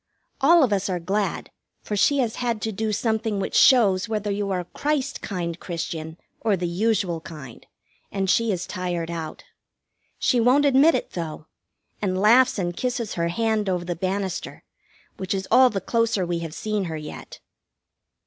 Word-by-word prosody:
All 330 +4 +6
of 235 -6 +2
us 195 0 0
are 180 -1 -1
glad, 195 +4 -2 0.3
for 210 - -3
she 280 +8 +3
has 240 -5 0
had 235 -3 -1
to 220 - -1
do 220 +1 -2
something 220 -1 -1
which 195 - -3
shows 215 -6 +5
whether 210 -2 -1
you 200 0 -2
are 185 -2 0
a - - -10
Christ 290 - -2
kind 170 -4 -4
Christian 160 -1 -5 0.2
or 215 -4 +1
the 175 0 -2
usual 185 -2 0
kind, 150 -8 -11 0.4
and 195 -1 -1
she 230 +3 +2
is 185 -2 -2
tired 175 -2 -3
out. 160 -2 -6 0.7
She 250 - +2
won't 255 +5 +4
admit 285 +4 +5
it, - - -3
though, 160 -3 -5 0.6
and 185 -2 0
laughs 240 +6 +5
and 175 -3 -2
kisses 245 -2 -2
her 170 -1 -1
hand 215 +2 0
over 180 -1 -1
the 175 0 -3
banister, 190 +1 -3 0.5
which 190 +1 -2
is 190 0 -4
all 255 +2 +7
the 200 - -2
closer 230 -1 0
we 170 -1 -2
have 165 -2 -6
seen 215 -2 -2
her 160 -2 -4
yet. 150 0 -9
195 Hz, 175 wpm, -24 LUFS, 175-230 Hz, 0.7 s, all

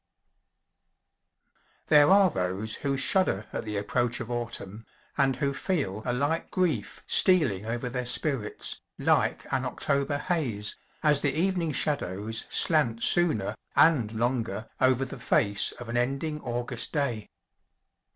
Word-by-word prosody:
_ - - -32
There 150 -1 +6
are 195 -2 +5
those 95 +1 -3
who 140 -1 -2
shudder 135 - +2
at - - -4
the 105 -1 -4
approach 120 +4 -1
of 120 0 -6
Autumn, 115 -3 -4 0.3
and 135 -2 +1
who 140 +1 -1
feel 140 - -2
a - - +1
light 145 +6 -1
grief 160 - -2
stealing 130 - +3
over 120 +2 -3
their 125 0 -3
spirits, 130 -5 0 0.2
like - - +1
an 130 -1 0
October 140 +2 -1
haze, 135 - -2 0.3
as 150 -2 +4
the 140 -1 0
evening 175 -1 0
shadows 110 - 0
slant 130 -9 +3
sooner, 110 - +4 0.2
and 130 -9 +3
longer, 115 -2 -2
over 130 0 +2
the 130 0 -9
face 100 -3 +1
of 120 - -10
an 115 +1 -3
ending 135 +5 -2
August 120 0 -1
day. 125 -8 -2
125 Hz, 135 wpm, -27 LUFS, 110-150 Hz, 0.3 s, There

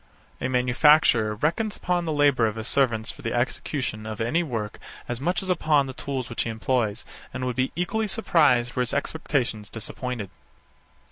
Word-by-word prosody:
A - - 0
manufacturer 125 -3 +4
reckons 170 - 0
upon 175 -1 -1
the 160 - -1
labour 145 -6 +3
of 110 - -3
his 110 -1 -5
servants 120 -5 +2
for - - -14
the - - -3
execution 120 -2 -2
of 110 -1 -6
any 120 +10 +1
work 115 -10 -4 0.3
as 120 +1 -3
much 175 +5 0
as 190 - -5
upon 155 -5 +3
the 130 - -6
tools 130 -2 -4
which 115 - -2
he - - -1
employs, 110 -1 -1 0.3
and 130 0 -4
would 125 -1 -2
be 130 +1 0
equally 215 +5 -1
surprised 150 - +3
were - - -1
his 125 +1 0
expectations 135 -7 -1
disappointed. 115 -2 -5
130 Hz, 180 wpm, -25 LUFS, 115-150 Hz, 0.3 s, manufacturer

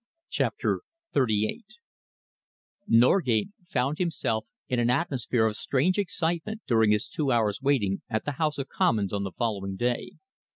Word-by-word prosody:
CHAPTER - - 0 0.3
XXXVIII 110 - +1 1.2
Norgate 120 - +4 0.2
found 135 +3 0
himself 125 -11 -1 0.2
in 125 - 0
an 120 0 +2
atmosphere 125 -5 +1
of 110 -1 0
strange 165 - +1
excitement 180 +3 -2
during 110 -5 +3
his 105 +1 +2
two 150 -7 -1
hours' 110 -2 +1
waiting 125 -9 +1
at 110 -1 -1
the 145 - -1
House 155 -1 +1
of 135 -1 -3
Commons 105 -4 +1
on 100 - 0
the 95 - -4
following 100 -3 -2
day. 120 +4 -1
120 Hz, 140 wpm, -27 LUFS, 110-150 Hz, 1.2 s, Norgate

